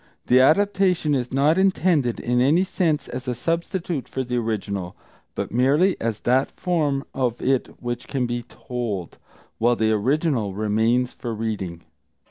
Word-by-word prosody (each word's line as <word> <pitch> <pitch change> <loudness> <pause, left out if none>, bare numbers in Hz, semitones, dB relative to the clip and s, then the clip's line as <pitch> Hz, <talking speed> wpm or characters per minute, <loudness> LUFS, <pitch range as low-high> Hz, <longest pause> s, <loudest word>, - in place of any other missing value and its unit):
The 125 - +5
adaptation 180 +1 +3
is 125 -3 -1
not 145 +6 +3
intended 175 -10 +2
in 125 +1 +1
any 155 +8 +4
sense 165 -6 0
as 125 +1 -6
a 125 - -1
substitute 165 - -2
for 130 - -2
the 125 0 -3
original, 100 -5 -3 0.4
but - - -3
merely 140 - +3
as 115 -2 -2
that 130 +2 +2
form 150 -6 -1
of 125 -3 -1
it 130 -1 +1
which 120 -1 -4
can 130 -3 -1
be 120 0 -2
told, 115 -7 -5 0.4
while 120 +2 +3
the 110 -1 +1
original 120 - 0
remains 110 +4 +1
for 115 -2 -5
reading. 100 -6 -4
125 Hz, 150 wpm, -23 LUFS, 115-150 Hz, 0.4 s, The